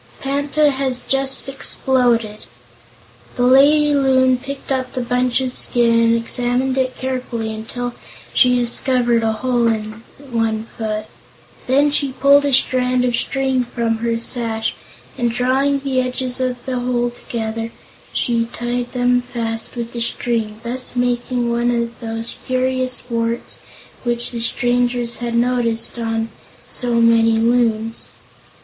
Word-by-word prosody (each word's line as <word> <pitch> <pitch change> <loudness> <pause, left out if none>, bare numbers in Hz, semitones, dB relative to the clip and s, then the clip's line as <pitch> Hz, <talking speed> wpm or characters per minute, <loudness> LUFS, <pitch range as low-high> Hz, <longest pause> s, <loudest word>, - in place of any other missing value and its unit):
"Panta 285 +2 +1
has 265 -2 -2
just 270 0 0
exploded." 245 - 0 0.9
The 245 - 0
lady 290 +4 +5
Loon 260 -2 +3
picked 275 +1 -7
up 260 -1 -1
the 255 - -2
bunch 250 +1 +1
of 260 -1 -2
skin 235 -2 +3
and 230 0 +4
examined 245 +3 0
it 260 -1 -1
carefully 250 -4 -3
until 240 +3 -5 0.4
she 250 -1 +5
discovered 240 0 +2
a 225 -1 +1
hole 240 +1 +1
in 215 -1 -2 0.3
one 225 -2 0
foot. 215 -1 -3 0.6
Then 285 +3 +3
she 280 -2 +2
pulled 280 +2 +5
a 285 - +1
strand 250 -1 +3
of 245 -1 +1
string 265 0 0
from 230 -2 -1
her 230 0 -1
sash, 230 -1 -2 0.5
and 240 -1 +2
drawing 260 +4 +1
the 265 -2 0
edges 255 0 -2
of 250 -1 -2
the 255 -1 -2
hole 245 -1 0
together, 225 -1 -4 0.4
she 235 -2 +1
tied 240 0 -3
them 245 0 +2
fast 230 -2 -3
with 235 -1 -5
the 235 - -4
string, 225 -2 -2
thus 250 +2 -4
making 245 0 0
one 240 +1 +1
of 235 -1 -2
those 225 0 -2
curious 255 0 -1
warts 230 -1 -3 0.4
which 240 -1 -1
the 235 - -4
strangers 245 0 +1
had 235 -1 -3
noticed 235 -1 +1
on 225 0 -2 0.4
so 245 -2 -1
many 230 -1 +4
Loons. 225 -1 +1
245 Hz, 140 wpm, -19 LUFS, 230-255 Hz, 0.9 s, lady